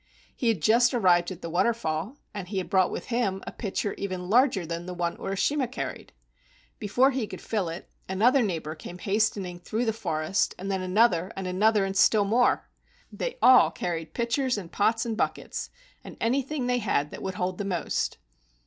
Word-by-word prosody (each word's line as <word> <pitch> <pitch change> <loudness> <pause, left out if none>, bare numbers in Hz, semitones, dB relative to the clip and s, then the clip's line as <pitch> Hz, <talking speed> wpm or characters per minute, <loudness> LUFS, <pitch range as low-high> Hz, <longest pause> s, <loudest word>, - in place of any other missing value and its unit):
He 245 - -2
had 210 -9 +1
just 235 +3 +4
arrived 175 -6 +4
at 185 -2 -9
the 170 - -4
waterfall, 185 - 0 0.2
and 200 -3 -6
he 195 +1 -4
had 180 -2 -3
brought 185 -2 +4
with - - -6
him 195 -5 0
a - - -5
pitcher 200 -1 -3
even 185 -2 -4
larger 240 -6 +4
than 170 +2 -5
the 180 - -5
one 170 -1 -1
Uri 195 0 -3
shima 280 +6 +1
carried. 250 - -6 0.7
Before 245 +6 +3
he 255 -5 -2
could - - -8
fill 205 -6 -2
it, 165 +2 -7 0.2
another 240 +8 +4
neighbor 165 -8 -2
came 175 +3 -9
hastening 195 -2 -1
through 220 +7 -2
the 220 - +1
forest, 170 -4 -1
and 195 +2 -4
then 190 -1 -1
another 185 -2 +2
and 195 - -5
another 200 +3 +2
and 195 0 -4
still 205 +1 +4
more. 235 +5 +2 0.4
They - - -4
all 255 -1 +8
carried 165 -2 -4
pitchers 245 +1 0
and 180 -4 -7
pots 225 +4 +1
and 230 -2 -2
buckets, - - -3 0.3
and - - -10
anything 270 +3 0
they 245 0 +1
had 150 -9 0
that - - -8
would 190 -1 -4
hold 180 0 -2
the - - -1
most. 180 -4 -1
195 Hz, 195 wpm, -27 LUFS, 180-235 Hz, 0.7 s, all